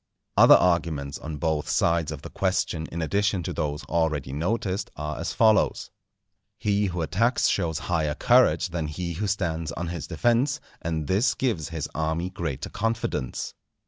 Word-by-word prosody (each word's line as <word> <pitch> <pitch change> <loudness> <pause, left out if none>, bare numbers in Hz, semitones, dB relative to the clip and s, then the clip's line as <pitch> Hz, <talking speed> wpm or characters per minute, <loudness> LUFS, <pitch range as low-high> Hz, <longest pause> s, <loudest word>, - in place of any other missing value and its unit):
Other - - +9
arguments 80 -6 +1
on 75 -1 -6
both 80 -1 -1
sides 85 -2 +2
of 75 -3 -7
the - - -8
question 95 -4 -1
in 85 0 -3
addition 100 +2 +1
to - - -3
those 75 -1 -2
already 80 -5 -1
noticed, 95 +5 -1
are 75 -1 -4
as - - -2
follows: 110 -2 +3 0.7
He 105 0 +1
who 90 -2 -2
attacks 115 +10 +2
shows 85 -5 0
higher 80 -4 0
courage - - +4
than 85 -2 -3
he 85 +3 -4
who 105 +5 -2
stands 85 -5 -1
on 85 0 -4
his 85 -4 -5
defence, 125 - +1 0.2
and 80 -2 -2
this 110 - +2
gives 110 - -1
his 80 -3 -4
army 80 +3 -1
greater 80 -6 -4
confidence. 110 - -2
85 Hz, 160 wpm, -26 LUFS, 80-100 Hz, 0.7 s, Other